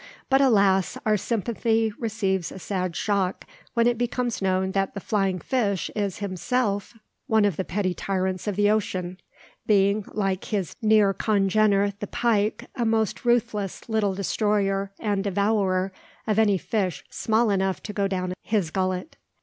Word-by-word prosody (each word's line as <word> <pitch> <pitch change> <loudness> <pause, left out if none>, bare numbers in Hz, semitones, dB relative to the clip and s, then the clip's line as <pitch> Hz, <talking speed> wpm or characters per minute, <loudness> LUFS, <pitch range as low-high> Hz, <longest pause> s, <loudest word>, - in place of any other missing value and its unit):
But, 270 +1 +5
alas! 200 -7 +3
our 215 -1 +3
sympathy 225 +1 0
receives 200 -6 -1
a - - -8
sad 185 -1 -3
shock, 195 -2 -1 0.3
when 235 0 +3
it 240 -1 +2
becomes 245 -1 -1
known 190 0 +1
that 195 +1 -1
the - - -3
flying 195 -2 0
fish 200 - -1
is 200 -3 -1
himself 205 +2 -2 0.3
one 220 -2 +4
of 200 -5 +1
the 190 - -2
petty 185 0 -1
tyrants 190 0 -2
of 205 - -1
the 205 +1 +3
ocean, 185 -4 -1 0.5
being, 200 0 +3
like 195 -3 -1
his 200 -6 -2
near 215 -2 +4
congener, 200 0 +2
the 205 - -4
pike, 215 -3 0
a 245 - -2
most 220 0 0
ruthless 230 -5 0
little 215 -4 0
destroyer 200 0 0
and 205 -3 -1
devourer 195 -1 +1 0.3
of 215 -1 +1
any 205 -3 +4
fish 190 -2 -2
small 220 0 +1
enough 190 -1 0
to 210 - -6
go 200 -1 +1
down 185 -2 -2
his 200 -8 -1
gullet. 185 - -2
200 Hz, 155 wpm, -25 LUFS, 190-220 Hz, 0.5 s, But